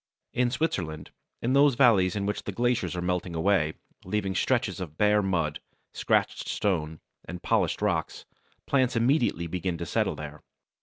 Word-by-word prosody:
] - - -58
In 125 - +3
Switzerland, 90 - -2 0.3
in 125 +3 +1
those 140 -1 +5
valleys 110 -8 +4
in 100 -1 -1
which 105 - -3
the - - -3
glaciers 120 -1 0
are 90 - -3
melting 90 -1 -2
away, 80 -2 +1 0.3
leaving 95 0 -2
stretches 115 -1 0
of 80 -4 -7
bare 105 0 +4
mud, 85 -6 -1 0.3
scratched - - 0
stones, 80 -6 -1 0.3
and 90 +1 -8
polished - - +1
rock, - - 0 0.5
plants 130 -3 +1
immediately 115 - +2
begin 90 +1 -3
to 85 - -4
settle - - 0
there. 75 0 -8
95 Hz, 160 wpm, -27 LUFS, 85-120 Hz, 0.5 s, those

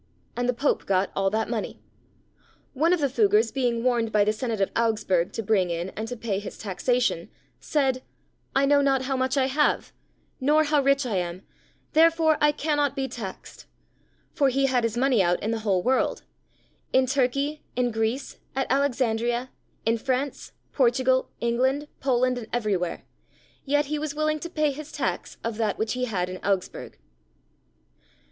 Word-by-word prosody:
And 245 0 -1
the - - +3
Pope 275 +4 0
got 190 0 +1
all 195 0 +2
that 220 +2 -1
money. 225 -3 -4 0.9
One 315 +6 +2
of 360 -3 +2
the 280 - +3
Fuggars 415 - +3
being 240 -3 0
warned 240 -3 +1
by 210 -1 +4
the 210 +1 +1
Senate 225 -1 -3
of 195 - +1
Augsburg 210 -6 +1
to 225 - -3
bring 195 -4 +2
in 170 +2 -2
and 220 +3 -5
to 245 +1 -5
pay 215 -4 -2
his 205 - -8
taxation, 220 -2 0 0.3
said, 270 -4 0 0.5
"I 275 +1 +4
know 285 0 +4
not 270 -2 +2
how 270 +1 -1
much 260 +1 0
I 265 - +3
have, 290 +3 +1 0.5
nor 300 +3 +4
how 295 -1 +2
rich 275 0 +2
I 220 -6 -1
am, 175 +1 -3 0.5
therefore 320 0 +4
I 295 0 +5
cannot 290 -2 0
be 270 -1 -1
taxed;" 230 -7 -8 0.7
for 280 -3 +3
he 270 +1 +1
had 255 -3 +2
his 230 0 -1
money 255 -4 +3
out 175 -1 +2
in 220 - 0
the 230 - -1
whole 195 -4 +1
world—in 260 0 -2
Turkey, 275 +3 0
in 245 0 +1
Greece, 225 +5 -2 0.2
at 270 0 +1
Alexandria, 245 -2 0 0.3
in 225 +1 +2
France, 260 +3 -2 0.2
Portugal, 260 0 +2
England, 260 +5 +1
Poland, 255 -1 +1
and 225 - -8
everywhere, 205 -7 -1 0.6
yet 290 +1 +2
he 300 +1 -2
was 300 -1 -4
willing 310 0 0
to 340 - -6
pay 305 -3 +1
his 300 +2 -8
tax - - -3
of 230 -2 -3
that 220 -3 0
which 220 0 -1
he 250 0 -1
had 185 -7 -1
in 185 0 -6
Augsburg. 195 -2 -2
250 Hz, 170 wpm, -25 LUFS, 220-280 Hz, 0.9 s, I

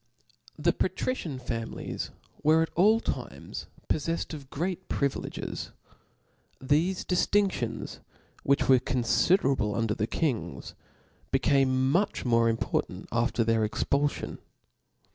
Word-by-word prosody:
The 170 +3 +2
patrician 185 - -2
families 115 -2 -4 0.3
were 155 +2 +5
at 165 - -4
all 215 +6 +5
times - - -5 0.2
poflcfled 165 +2 -1
of 140 -3 -8
great 180 +5 -3
privileges* 140 -1 -2 0.9
Thefe 160 +8 +1
diftindlrgns, 180 - 0 0.4
which 140 0 +2
were 130 -1 +7
confiderablc 130 - +2
under 115 -2 +1
the 110 -1 -1
kings, 140 -7 -2 0.6
became 135 0 +3
much 185 0 +1
more 115 -1 +4
important 115 - -2
after 115 0 +1
their 115 0 +2
expulfion. 140 +6 -1
140 Hz, 105 wpm, -28 LUFS, 120-170 Hz, 0.9 s, were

